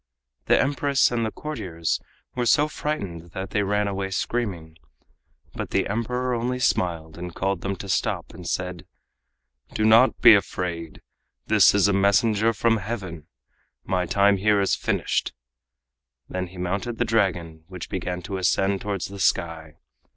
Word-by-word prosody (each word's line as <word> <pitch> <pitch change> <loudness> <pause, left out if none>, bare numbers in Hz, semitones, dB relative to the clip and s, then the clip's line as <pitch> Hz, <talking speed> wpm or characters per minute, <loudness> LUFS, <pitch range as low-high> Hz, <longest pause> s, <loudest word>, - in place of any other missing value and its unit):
The - - +5
Empress 140 -1 +2
and 120 -1 0
the 110 - -1
courtiers 90 - -3 0.3
were 120 -1 -1
so 150 +4 +4
frightened 95 - -5
that 95 -1 -5
they 105 - +1
ran 105 +1 0
away 95 -1 -3
screaming. 90 -6 -3 0.7
But - - -5
the - - +1
Emperor 125 +4 -1
only 120 +2 -1
smiled 85 -9 -1
and 90 -1 -7
called 95 -2 -1
to - - -4
them 100 - -1
to 100 - -8
stop, 95 - -1
and - - -7
said: 90 -2 -4 0.9
"Do 110 - +1
not 115 +4 +5
be 120 -2 +9
afraid. 85 -5 -2 0.4
This 105 -2 +5
is 100 -1 +4
a 100 - +2
messenger 100 +3 +3
from 115 +1 +2
Heaven. 95 -7 -6 0.6
My 90 -1 -1
time 100 +2 +3
here 105 +1 +3
is 95 - +1
finished!" - - -1 1.0
He - - -13
then 90 -1 -3
mounted 100 +6 -3
the - - +1
Dragon, 90 -7 -1
which 90 -2 -8
began 90 -1 -4
to 95 0 -4
ascend 95 +1 +1
towards 100 -3 -3
the 100 0 -8
sky. 80 -4 -1
100 Hz, 160 wpm, -24 LUFS, 90-115 Hz, 1.0 s, be